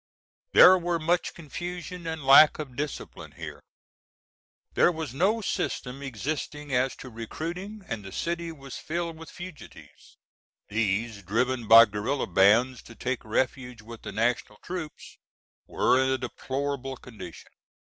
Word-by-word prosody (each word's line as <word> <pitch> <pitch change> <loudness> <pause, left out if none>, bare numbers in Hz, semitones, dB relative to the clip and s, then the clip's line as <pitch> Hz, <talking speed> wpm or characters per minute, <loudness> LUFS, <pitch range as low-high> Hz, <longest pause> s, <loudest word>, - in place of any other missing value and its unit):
There 185 0 +9
were 175 0 0
much 170 +2 0
confusion 175 +2 -6
and 160 -3 -4
lack 140 +3 +8
of 140 -5 -7
discipline 145 +1 -6
here. - - -8 1.1
"There - - +4
was 160 -6 -5
no 195 +10 +2
system 135 -8 -3
existing 145 +2 -4
as 125 +1 +1
to 130 - -10
recruiting 175 - -6
and 110 -3 -4
the 95 - -9
city 170 - -3
was 135 -4 -9
filled 170 0 -3
with 165 +1 -11
fugitives. 175 -3 -12 0.5
These, 110 0 -1
driven 120 +5 -1
by 115 +1 +10
guerilla 110 +7 -2
bands 110 +7 +4
to 115 - -12
take 130 -1 -3
refuge 125 +1 -2
with 115 +1 -10
the 105 - -7
national 110 0 -1
troops, 175 -4 -7 0.5
were 130 +1 +3
in 130 - +1
a 130 - +1
deplorable 135 +1 -4
condition." 95 -9 -11
135 Hz, 140 wpm, -27 LUFS, 115-165 Hz, 1.1 s, by